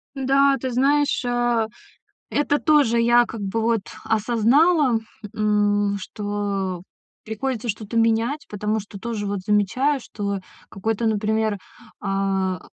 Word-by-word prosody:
Да, 275 +1 +3
ты 260 - -3
знаешь, 280 +2 +2
а, 240 -2 +1 0.6
это 290 0 +1
тоже 285 -7 +3
я 240 +1 +5
как 225 -2 -8
бы 200 +3 -2
вот 230 -2 +2 0.2
осознала, 240 - +3 0.4
м, 205 -1 +1
что 200 -3 -3 0.4
приходится 230 +2 -3
что-то 215 +2 -4
менять, 230 +6 +1
потому 210 +1 -2
что 200 -1 -9
тоже 220 -1 -3
вот 200 -1 -2
замечаю, 235 +8 +2
что 200 -4 -4 0.3
какой-то, 220 +3 -2
например, 215 -1 0 0.4
а, 195 -2 -1
220 Hz, 120 wpm, -23 LUFS, 205-245 Hz, 0.6 s, я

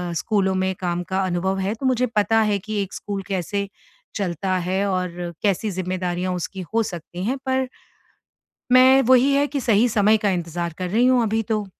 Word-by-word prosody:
स्कूलों 190 +1 +1
में 190 0 0
काम 175 -1 -2
का 190 +2 -2
अनुभव 185 +1 -1
है 195 +2 -1
तो 245 - -6
मुझे 255 -1 +2
पता 225 0 +2
है 210 -2 +1
कि 210 +1 -3
एक 195 - -10
स्कूल 200 -1 -5
कैसे 200 +1 -2 0.5
चलता 185 -1 -1
है 185 +2 -1
और 180 -2 -3
कैसी 205 +1 +1
ज़िम्मेदारियाँ 185 0 -2
उसकी 185 +2 -5
हो 230 0 +3
सकती 175 -1 -7
हैं 260 +5 -1
पर 260 0 0 1.1
मैं 260 +1 +7
वही 260 +2 +4
है 285 +1 +3
कि 290 -1 -3
सही 230 -1 +3
समय 215 -1 +3
का 205 -1 +1
इंतज़ार 170 -1 -3
कर 185 -1 -3
रही 235 +6 +3
हूँ 255 -1 +4
अभी 225 0 0
तो। 215 -2 -1
200 Hz, 190 wpm, -22 LUFS, 185-225 Hz, 1.1 s, मैं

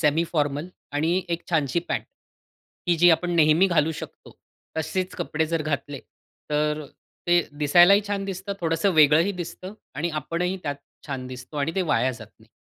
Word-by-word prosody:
Semi 155 +2 +3
formal 145 +1 0 0.2
आणि 165 +6 +1
एक 170 0 -2
छानशी 155 -1 +1
पँट, - - -1 0.9
ही 175 - +4
जी 175 +1 +7
आपण 175 +2 +2
नेहमी 155 +4 +5
घालू 160 -3 +2
शकतो. - - -10 0.4
तसेच 180 +4 -2
कपडे 160 -3 -1
जर 165 -1 -1
घातले, 145 -2 -3 0.5
तर 150 0 +1
अ, 145 - -10 0.4
ते 175 0 +5 0.2
दिसायलाही 175 +7 +6
छान 200 -1 -2
दिसतं. 195 +1 -4
थोडंसं 165 +3 +1
वेगळंही 155 +5 +5
दिसतं 185 +1 -7 0.2
आणि 165 +4 -2
आपणही 180 +5 -2
त्यात 145 -2 -3 0.3
छान 135 -3 -4
दिसतो 130 +3 -9
आणि 145 +3 -1
ते 190 - +1
वाया 140 -6 +1
जात 115 -2 -11
नाही. 110 - -21
160 Hz, 165 wpm, -25 LUFS, 150-175 Hz, 0.9 s, जी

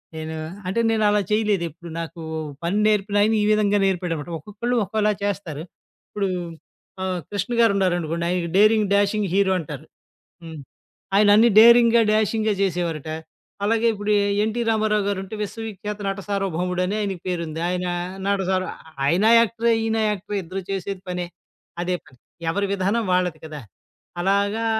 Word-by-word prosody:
నేను 160 0 -5 0.3
అంటే 195 +5 -1
నేనలా 210 -2 +2
చేయలేదెప్పుడు, 175 -6 -1
నాకు 165 0 -8 0.4
పని 175 +4 0
నేర్పినాయన 205 +1 +2
ఈ - - +2
విధంగా 210 -1 +3
నేర్పాడనమాట. 175 -4 -2
ఒక్కొక్కళ్ళు 215 +8 -3
ఒక్కోలా 210 +2 0
చేస్తారు. 180 -7 -3 0.5
ఇప్పుడు, 200 -1 -2 0.8
ఆహ్, 185 -1 -2
కృష్ణగారున్నారనుకోండి. 195 -6 +1
ఆయనకి 175 -2 -1
డేరింగ్, 215 0 +5
డాషింగ్ 205 -1 +1
హీరో 195 -1 +3
అంటారు. 150 -1 -7 0.6
హ్మ్. 160 -2 -8 0.6
ఆయన 205 0 +5
అన్ని 230 +2 +6
డేరింగా, 235 0 +7
డాషింగా 215 0 +1
చేసేవారటా. 165 -4 -2 0.5
అలాగే 230 +2 +2
ఇప్పుడు 205 0 -2 0.3
ఎన్టీ 220 +2 -1
రామారావు 215 -1 +1
గారుంటే 195 +1 -3
'విశ్వవి 225 +2 -5
ఖ్యాత 210 0 -4
నటసార్వ 195 0 -2
భౌముడు' 180 +1 -1
అని 200 +3 -2
ఆయనకి 195 -4 -3
పేరుంది. 170 -3 -3
ఆయన 180 0 -2 0.4
నటసార్వ 190 -2 0 0.4
ఆయన 175 +8 +2
యాక్టరే, 230 0 +1
ఈయన 225 0 0
యాక్టరే 205 0 -4
ఇద్దరు 190 +3 -5
చేసేది 195 0 -4
పనే. 180 -1 -3 0.6
అదే 180 0 -1
పని 130 - -21 0.3
ఎవరి 200 +4 0
విధానం 200 +4 0
వాళ్ళది 180 -3 +1
కదా! 155 -1 -7 0.6
అలాగా 200 +4 +1
200 Hz, 135 wpm, -23 LUFS, 180-215 Hz, 0.8 s, డేరింగా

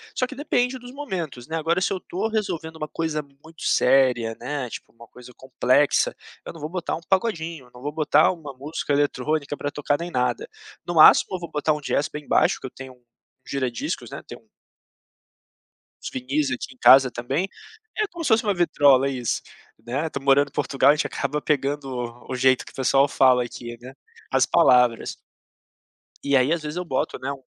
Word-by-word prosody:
só 255 - +1
que 275 - -10
depende 260 -2 0
dos 245 0 -11
momentos, 175 - -6
né, 160 - -4
agora 165 +3 +1
se 185 - 0
eu - - -2
estou 190 +3 -3
resolvendo 170 -7 -3
uma 155 -1 -5
coisa 160 -1 -2
muito 145 +3 -16
séria, 125 -4 +3
né, 140 -2 -4
tipo - - -9
uma 115 0 -16
coisa 125 +1 -14
complexa, 130 +2 +2 0.3
eu - - -6
não 165 - -12
vou 150 +1 -5
botar 175 0 -3
um - - -8
pagodinho, 170 - -1
não 125 - -13
vou 145 +2 -3
botar 155 0 +3
uma 160 -6 -8
música 145 +4 -5
eletrônica 145 +1 0
pra 145 0 -4
tocar 145 0 -1
nem 175 +1 -5
nada, 130 - -1 0.4
no 175 - -4
máximo 160 +3 +7
eu - - -4
vou 170 - -8
botar 150 +1 0
um 150 - -5
jazz 145 0 -1
bem 150 -1 -8
baixo, - - +2
que - - -10
eu - - -12
tenho 130 -1 -10
um 125 -1 -27 0.4
gira 130 -3 -2
discos, 115 - -4
né, - - -7
tem - - -9
um - - -26 1.6
uns - - -4
vinis 135 +2 -1
aqui 130 +1 -5
em - - -31
casa 130 0 +7
também 135 +11 -2 0.5
é 430 -1 +1
como 345 -2 -8
se 295 - 0
fosse 225 -1 +4
uma 205 -2 +1
vitrola 145 -6 +4
isso, 125 -4 -2 0.4
né, 140 +7 -2
estou 140 -3 -6
morando 140 +1 +4
em - - -31
Portugal 135 +1 +3
a - - +2
gente 155 - -1
acaba 145 +1 -3
pegando 145 -1 -1 0.4
o 130 - -2
jeito 130 0 +3
que - - -12
o - - -20
pessoal 135 +1 +3
fala 130 -2 +4
aqui, 120 0 -8
né, 130 +2 -10 0.4
as - - +3
palavras. 125 -2 +3 1.1
E 140 0 +1
aí 130 +3 +2
às 170 -1 0
vezes 150 +3 -5
eu 180 - -3
boto 130 -6 -2
né, 135 +2 -3
um 135 -1 -9
145 Hz, 205 wpm, -23 LUFS, 130-165 Hz, 1.6 s, máximo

